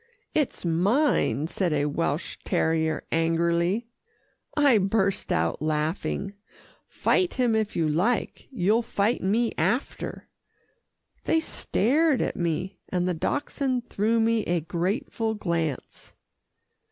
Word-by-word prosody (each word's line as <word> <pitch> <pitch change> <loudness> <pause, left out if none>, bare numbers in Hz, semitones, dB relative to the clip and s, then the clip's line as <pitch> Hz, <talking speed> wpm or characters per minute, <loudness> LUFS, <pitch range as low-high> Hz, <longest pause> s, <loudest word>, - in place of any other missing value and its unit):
"It's 295 -10 -1
mine," 180 - +2
said 175 +1 -1
a 145 -1 +1
Welsh 150 +1 -2
terrier 160 -1 0
angrily. 170 +5 +1 0.7
I 280 -7 +5
burst 195 0 0
out 80 - 0
laughing. 155 +6 -1 0.5
"Fight 365 -2 +1
him 245 -3 +2
if 220 -1 0
you 165 -2 +1
like. 185 +11 0
You'll 215 -1 +2
fight 225 0 0
me 225 +5 +1
after." 210 - -2 1.0
They 325 - +3
stared 295 0 +1
at - - -1
me, 175 +3 -2
and 180 -1 0
the 180 - +1
Dachshund 260 - -1
threw 220 +3 +1
me 225 0 +2
a 175 -1 0
grateful 190 - -2
glance. 170 -8 -3
195 Hz, 115 wpm, -26 LUFS, 165-230 Hz, 1.0 s, I